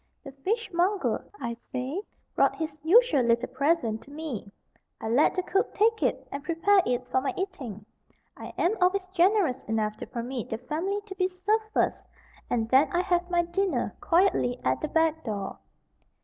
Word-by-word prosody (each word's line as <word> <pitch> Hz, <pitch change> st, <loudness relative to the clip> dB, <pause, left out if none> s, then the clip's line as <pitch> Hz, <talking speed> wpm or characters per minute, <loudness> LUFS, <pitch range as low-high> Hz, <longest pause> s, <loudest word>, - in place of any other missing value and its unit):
the 275 Hz, -, -8 dB
fishmonger, 380 Hz, -, 0 dB, 0.2 s
I 235 Hz, 0 st, -3 dB, 0.2 s
say, 260 Hz, +8 st, -3 dB, 0.3 s
brought -, -, +3 dB
his 315 Hz, -3 st, -4 dB
usual 410 Hz, -, +5 dB
little 235 Hz, +1 st, +2 dB
present 280 Hz, -7 st, +1 dB
to -, -, -16 dB
me. 285 Hz, -9 st, -6 dB, 0.5 s
I -, -, -5 dB
let 245 Hz, +7 st, +3 dB
the 370 Hz, -, 0 dB
cook 385 Hz, +2 st, 0 dB
take 445 Hz, +1 st, +3 dB
it -, -, 0 dB
and 280 Hz, 0 st, -5 dB
prepare 355 Hz, +5 st, +3 dB
it 250 Hz, 0 st, 0 dB
for 260 Hz, -, +2 dB
my 270 Hz, -, -2 dB
eating. 260 Hz, -, -5 dB, 0.5 s
I -, -, -8 dB
am 370 Hz, +6 st, +2 dB
always 370 Hz, +1 st, +3 dB
generous 365 Hz, -6 st, +3 dB
enough 215 Hz, -1 st, -1 dB
to -, -, -7 dB
permit 240 Hz, 0 st, -5 dB
the 225 Hz, -, -2 dB
family 335 Hz, -, -2 dB
to 400 Hz, -, -7 dB
be 370 Hz, -1 st, +1 dB
served 405 Hz, +4 st, 0 dB
first -, -, +1 dB, 0.5 s
and 225 Hz, -2 st, 0 dB
then 265 Hz, +4 st, +5 dB
I 350 Hz, -, +2 dB
have 355 Hz, -1 st, 0 dB
my 345 Hz, -1 st, +2 dB
dinner 375 Hz, +3 st, -1 dB
quietly 335 Hz, -9 st, +2 dB
at -, -, +1 dB
the 310 Hz, -, -1 dB
back 320 Hz, 0 st, +1 dB
door. 205 Hz, -4 st, -4 dB
320 Hz, 175 wpm, -27 LUFS, 250-375 Hz, 0.5 s, usual